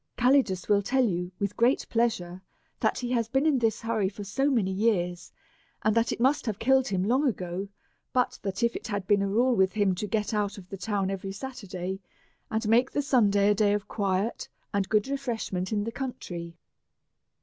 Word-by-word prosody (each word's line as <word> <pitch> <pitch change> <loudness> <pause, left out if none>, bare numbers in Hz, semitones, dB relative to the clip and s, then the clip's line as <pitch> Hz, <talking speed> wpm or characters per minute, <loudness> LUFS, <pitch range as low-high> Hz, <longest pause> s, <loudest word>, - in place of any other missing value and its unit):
Calidus 245 -8 +3
will 205 -1 +4
tell 255 +5 +2
you, 180 -3 -2
with 200 0 -2
great 240 +4 +2
pleasure, 185 -6 -1 0.4
that - - +1
he 245 -1 -3
has 230 -3 +1
been 270 +5 +1
in 295 -5 +3
this 225 -2 0
hur 225 -1 -1
ry 190 -2 +2
for 205 +1 -8
so 270 +9 0
many 220 -8 +1
years, 180 -4 0 0.5
and 215 - +3
that 230 0 +2
it - - -3
must 265 +2 +2
have 210 -3 -1
killed 265 +3 +3
him 185 -2 0
long 260 +8 +2
ago, 185 -4 -3 0.4
but 250 -1 0
that 195 +3 -3
it 235 0 0
has 205 -3 -2
been 200 +1 +3
a 200 - +1
rule 240 +5 +3
with 190 -2 +3
him 205 -3 +2
to 195 +4 -4
get 210 +1 -1
out 210 -1 -1
of 185 -3 -11
the 195 - -6
town 195 -1 -1
every 195 0 -4
Saturday, 195 -5 -5 0.5
and 220 0 -1
make 240 +4 +4
the 290 - -1
Sunday 205 -7 +4
a - - +5
day 205 0 +2
of 205 0 -2
quiet 200 +1 -1 0.2
and 200 -1 0
good 215 +1 +2
refreshment 230 -9 -3
in 205 -1 0
the 230 - -3
country. 175 -10 -6
210 Hz, 205 wpm, -27 LUFS, 195-240 Hz, 0.5 s, a